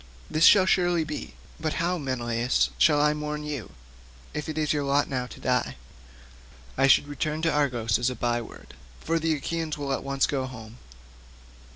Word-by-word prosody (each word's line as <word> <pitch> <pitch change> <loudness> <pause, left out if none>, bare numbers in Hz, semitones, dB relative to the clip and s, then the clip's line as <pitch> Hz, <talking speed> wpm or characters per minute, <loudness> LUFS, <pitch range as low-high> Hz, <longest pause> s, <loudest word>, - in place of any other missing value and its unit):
This 155 +2 +4
shall 195 -3 +7
surely 175 -3 +2
be; 150 -1 -6 0.2
but 155 -1 -2
how, 175 +1 -1
Menelaus, 120 - 0
shall 145 - +5
I 150 0 +3
mourn 150 0 -4
you, 145 -8 -6 0.6
if 150 +1 -4
it 155 - -4
be 155 - 0
your 150 -1 0
lot 140 +1 +2
now 125 -2 -3
to - - -12
die? - - 0 1.0
I 135 +1 +3
should 140 - +5
return 150 +2 -3
to 165 - +3
Argos 120 -8 +1
as 120 +1 +1
a 125 - -5
by 120 -1 0
word, 115 - -12 0.3
for 165 +1 -1
the 160 0 +1
Achaeans 160 +1 -3
will 140 -2 -2
at - - -3
once 140 0 +1
go 135 -2 -2
home. 115 -2 -11
145 Hz, 185 wpm, -26 LUFS, 125-155 Hz, 1.0 s, shall